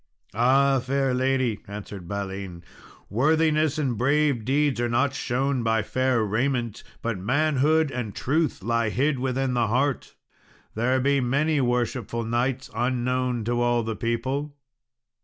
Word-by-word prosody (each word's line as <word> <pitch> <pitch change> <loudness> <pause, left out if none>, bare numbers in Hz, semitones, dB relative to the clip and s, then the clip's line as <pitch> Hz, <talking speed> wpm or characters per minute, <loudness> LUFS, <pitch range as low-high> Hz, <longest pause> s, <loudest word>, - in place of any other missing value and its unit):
"Ah, 135 +4 +3
fair 135 +1 0
lady," 130 -4 +1
answered 100 -3 -8
Balin, 95 -2 -5 0.4
"worthiness 155 - +2
and 130 -7 -1
brave 140 -2 +2
deeds 135 0 +1
are 120 - 0
not 130 +4 +1
shown 135 0 -1
by 115 -2 +1
fair 130 0 +1
raiment, 120 +1 -1 0.2
but 115 -4 -2
manhood 150 +6 +2
and 120 -6 -4
truth 150 - 0
lie 115 0 +1
hid 135 +4 0
within 130 0 -1
the 120 -2 +1
heart. 130 +4 -1 0.6
There 125 +4 +1
be 140 +1 +2
many 140 +4 +1
worshipful 120 -2 -1
knights 120 +3 -1
unknown 125 0 -1
to 120 +2 0
all 120 -1 +2
the 110 0 -3
people." 130 +6 -2
125 Hz, 135 wpm, -25 LUFS, 115-140 Hz, 0.6 s, Ah